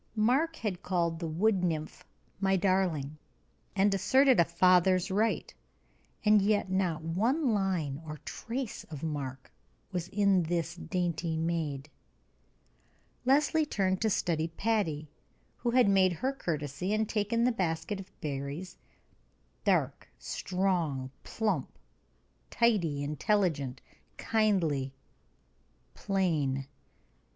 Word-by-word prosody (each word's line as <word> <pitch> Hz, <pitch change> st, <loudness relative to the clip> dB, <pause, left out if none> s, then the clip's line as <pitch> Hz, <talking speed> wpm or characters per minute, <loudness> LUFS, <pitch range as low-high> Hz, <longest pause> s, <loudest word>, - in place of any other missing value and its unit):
Mark 265 Hz, +10 st, +2 dB
had 200 Hz, -, -3 dB
called 170 Hz, -4 st, 0 dB
the 170 Hz, -, -3 dB
wood 185 Hz, +4 st, +1 dB
nymph 155 Hz, -3 st, -2 dB, 0.4 s
"my 195 Hz, -1 st, +2 dB
darling," 175 Hz, -6 st, 0 dB, 0.6 s
and 200 Hz, +1 st, +3 dB
asserted 260 Hz, +6 st, +4 dB
a -, -, +8 dB
father's 180 Hz, +2 st, +3 dB
right; 215 Hz, +4 st, 0 dB, 0.7 s
and 210 Hz, -1 st, +6 dB
yet 205 Hz, -1 st, +1 dB
not 180 Hz, -4 st, 0 dB
one 230 Hz, -, +1 dB
line 175 Hz, -8 st, -1 dB
or 155 Hz, -1 st, -7 dB
trace 240 Hz, 0 st, -5 dB
of 150 Hz, -2 st, -9 dB
Mark 135 Hz, -4 st, -4 dB, 0.4 s
was 175 Hz, -2 st, -3 dB
in 200 Hz, -1 st, +3 dB
this 170 Hz, 0 st, -2 dB
dainty 175 Hz, -2 st, -2 dB
maid. 160 Hz, -4 st, -2 dB, 1.4 s
Leslie 295 Hz, +4 st, +3 dB
turned 190 Hz, -10 st, 0 dB
to 220 Hz, -, +2 dB
study 165 Hz, -5 st, 0 dB
Patty, 165 Hz, -5 st, -1 dB, 0.5 s
who 240 Hz, -, -1 dB
had 245 Hz, -2 st, +4 dB
made 190 Hz, -2 st, +4 dB
her 260 Hz, +10 st, -1 dB
courtesy 155 Hz, -, -3 dB
and 215 Hz, 0 st, 0 dB
taken 215 Hz, +2 st, 0 dB
the 250 Hz, -, +4 dB
basket 190 Hz, 0 st, -2 dB
of 195 Hz, 0 st, -9 dB
berries 150 Hz, +4 st, -5 dB, 0.9 s
dark, -, -, +1 dB
strong, 170 Hz, -9 st, -1 dB
plump, 220 Hz, -1 st, -2 dB, 0.7 s
tidy, 175 Hz, -12 st, +1 dB
intelligent, 150 Hz, -3 st, 0 dB, 0.4 s
kindly, 165 Hz, -12 st, +1 dB, 1.0 s
plain. 155 Hz, -9 st, 0 dB
185 Hz, 110 wpm, -30 LUFS, 160-210 Hz, 1.4 s, a